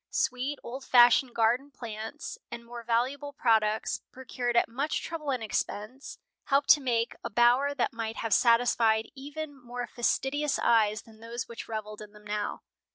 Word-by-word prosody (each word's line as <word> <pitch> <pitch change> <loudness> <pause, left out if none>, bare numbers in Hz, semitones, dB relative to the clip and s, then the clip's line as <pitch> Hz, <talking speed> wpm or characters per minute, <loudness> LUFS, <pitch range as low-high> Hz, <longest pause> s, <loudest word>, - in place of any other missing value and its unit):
Sweet, 260 +3 -1
old 260 +3 -7
fashioned 245 0 +5
garden 235 +5 +2
plants 235 +1 -7
and 235 0 -8
more 240 0 -8
valuable 260 +5 -1
products, 220 -4 +1
procured 245 -2 -3
at - - +4
much 275 +6 -2
trouble 320 -3 -5
and 255 -4 -1
expense, 215 +4 -4 0.3
helped 275 0 +2
to 295 - +8
make 235 -3 0
a 235 - -3
bower 245 +6 +3
that 260 - 0
might 225 -1 -4
have 225 -2 -1
satisfied 230 -2 +3
even 290 +2 -7
more 245 0 -5
fastidious 270 +5 0
eyes 215 -2 +2
than 220 -1 -18
those 230 +1 -6
which 235 - -8
reveled 215 -1 -6
in 210 0 -11
them 210 0 -16
now. 210 0 -3
240 Hz, 160 wpm, -29 LUFS, 225-270 Hz, 0.3 s, to